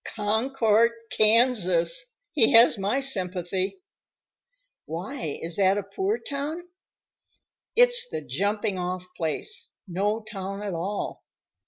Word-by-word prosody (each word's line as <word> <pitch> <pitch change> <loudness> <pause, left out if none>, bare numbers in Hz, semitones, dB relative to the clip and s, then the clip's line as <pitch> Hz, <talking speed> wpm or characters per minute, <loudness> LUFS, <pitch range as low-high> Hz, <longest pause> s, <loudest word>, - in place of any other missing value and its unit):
"Concord, 225 +1 +2 0.2
Kansas. 220 - +4 0.3
He 275 -3 +4
has 230 +2 +7
my 210 +6 -1
sympathy!" 190 - -1 1.1
"Why, 175 - -5
is 165 0 -3
that 195 0 +3
a 205 - -2
poor 385 - -2
town?" 305 +3 -5 1.1
"It's 485 0 +4
the - - -4
jumping 200 - -1
off 180 0 -3
place, 415 - -2 0.2
no 205 +5 -1
town 195 -1 -6
at 200 -3 -3
all. 190 +5 -4
210 Hz, 110 wpm, -26 LUFS, 185-265 Hz, 1.1 s, has